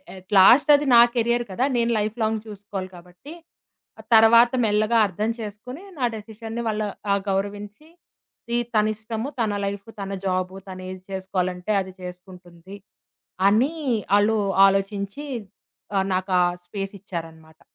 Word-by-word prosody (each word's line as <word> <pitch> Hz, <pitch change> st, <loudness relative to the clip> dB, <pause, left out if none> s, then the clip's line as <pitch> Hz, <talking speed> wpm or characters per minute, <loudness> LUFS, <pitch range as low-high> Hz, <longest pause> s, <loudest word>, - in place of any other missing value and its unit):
At 185 Hz, +2 st, -15 dB
last 245 Hz, +11 st, +7 dB
అది 290 Hz, +1 st, 0 dB
నా 235 Hz, -, +9 dB
career 235 Hz, +1 st, +1 dB
కదా! 245 Hz, +8 st, 0 dB
నేను 235 Hz, 0 st, +1 dB
లైఫ్ 215 Hz, +3 st, -3 dB
లాంగ్ 220 Hz, 0 st, 0 dB
చూసుకోవాలి 200 Hz, -2 st, -7 dB
కాబట్టి, 180 Hz, -, -13 dB, 0.8 s
తర్వాత 230 Hz, +2 st, +7 dB
మెల్లగా 215 Hz, +2 st, +2 dB
అర్థం 210 Hz, +4 st, -3 dB
చేసుకొని, 225 Hz, -, -8 dB, 0.2 s
నా 250 Hz, -, +2 dB
డెసిషన్ని 225 Hz, +2 st, -7 dB
వాళ్ళు 215 Hz, -1 st, -1 dB, 0.2 s
ఆహ్, 200 Hz, -, +2 dB
గౌరవించి 205 Hz, +7 st, -4 dB, 0.6 s
ఇది 240 Hz, -, +2 dB, 0.2 s
తన 215 Hz, 0 st, +4 dB
ఇష్టము, 220 Hz, +3 st, -5 dB
తన 220 Hz, -3 st, +1 dB
లైఫ్ 200 Hz, +1 st, -5 dB
తన 195 Hz, 0 st, -5 dB
జాబు, 185 Hz, 0 st, -1 dB
తను 185 Hz, 0 st, -8 dB
ఏది 185 Hz, 0 st, -8 dB
చేసుకోవాలంటే 185 Hz, 0 st, -3 dB
అది 190 Hz, -1 st, -8 dB
చేసుకుంటుంది. 180 Hz, 0 st, -11 dB, 0.7 s
అని 245 Hz, +10 st, +3 dB, 0.4 s
ఆళ్ళు 215 Hz, +2 st, +2 dB, 0.3 s
ఆలోచించి, 200 Hz, +6 st, -2 dB, 0.7 s
ఆహ్, 190 Hz, -, +1 dB
నాకా 185 Hz, 0 st, 0 dB, 0.3 s
స్పేసిచ్చారనమాట. 175 Hz, -5 st, -8 dB
205 Hz, 130 wpm, -23 LUFS, 185-225 Hz, 0.8 s, నా